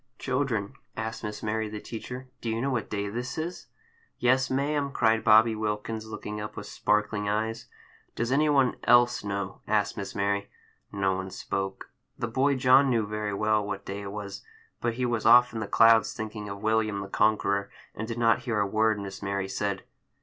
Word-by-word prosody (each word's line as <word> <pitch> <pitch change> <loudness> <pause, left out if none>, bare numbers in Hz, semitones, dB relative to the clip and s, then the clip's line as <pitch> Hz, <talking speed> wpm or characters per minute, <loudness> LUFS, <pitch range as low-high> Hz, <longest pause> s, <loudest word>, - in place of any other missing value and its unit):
"CHILDREN," 125 -6 -1 0.2
asked 110 +1 -4
Miss 105 -1 -5
Mary, 110 0 -1
the 105 0 -6
teacher, 125 +4 -7
"do 115 - -3
you 110 0 -1
know 135 +3 0
what 120 -4 -2
day 100 -1 -2
this 120 +5 -4
is?" 170 +3 -5 0.5
"Yes, 130 +1 +2
ma'am!" 140 +1 0
cried 110 -3 +2
Bobby 110 +1 +6
Wilkins, 110 +1 -3
looking 105 -1 -6
up 105 - -6
with 105 - -5
sparkling 105 0 0
eyes. 110 +2 -2 0.5
"Does 120 +2 -1
any 150 +3 +3
one 135 -4 +3
else 120 0 +5
know?" 100 -2 -4
asked 105 -1 +1
Miss 100 - -5
Mary. 100 0 0 0.4
No 95 -2 +1
one 95 0 -4
spoke. 95 +1 -4 0.3
The 120 - -2
boy 135 +5 +2
John 130 +2 +5
knew 115 -4 +2
very 105 -1 -3
well 105 +1 +2
what 100 -1 -5
day 100 +1 -5
it 100 -1 -6
was, 100 -1 -6 0.4
but 120 -1 -1
he 125 +1 -1
was 120 -2 0
off 125 0 +7
in 115 - -3
the 110 - -3
clouds, 115 +2 +5
thinking 110 -2 -5
of 100 0 -7
William 110 -2 +1
the 95 - -6
Conqueror, 100 -1 +1 0.2
and 110 - -5
did 115 0 -4
not 115 -1 +3
hear 115 -4 0
a 100 - +2
word 110 +1 +1
Miss 95 -1 -7
Mary 100 -1 -2
said. 100 0 -2
110 Hz, 195 wpm, -27 LUFS, 100-120 Hz, 0.5 s, off